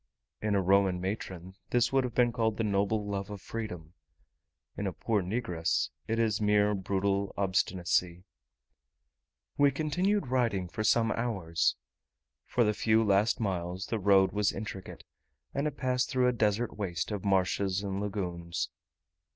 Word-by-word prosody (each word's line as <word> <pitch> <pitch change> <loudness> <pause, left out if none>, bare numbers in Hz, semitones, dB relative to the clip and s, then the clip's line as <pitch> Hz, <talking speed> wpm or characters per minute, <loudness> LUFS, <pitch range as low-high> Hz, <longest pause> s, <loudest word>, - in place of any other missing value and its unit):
In 105 -1 +1
a 95 - +2
Roman 95 -1 +3
matron 95 -1 -5 0.2
this 120 +1 +2
would 135 -1 +4
have 120 - -5
been 120 -1 +4
called 110 -2 0
the 115 - 0
noble 105 +1 +1
love 100 -1 -3
of 105 -1 -6
freedom: 90 -7 -6 0.8
in 100 - -2
a 95 - -3
poor 110 -3 0
negress 90 - -1 0.2
it 115 - 0
is 110 -2 +1
mere 105 0 +3
brutal 100 0 0
obstinacy. 90 -2 0 1.3
We 145 0 +6
continued 160 +5 0
riding 115 -8 +1
for 110 - -3
some 115 0 +3
hours. 95 -9 0 0.7
For 120 - +2
the 105 -1 +2
few 110 +2 +3
last 105 +1 +3
miles 95 -3 -2
the 115 - -2
road 95 -1 +4
was 105 -1 +1
intricate, 95 -3 -7 0.5
and 140 +2 0
it 150 - -5
passed 125 -1 0
through 130 -1 +2
a 125 - +3
desert 110 0 0
waste 95 -3 -3
of 105 -3 -3
marshes 95 0 +1
and 100 0 -3
lagoons. 90 -5 -3
100 Hz, 150 wpm, -30 LUFS, 95-115 Hz, 1.3 s, We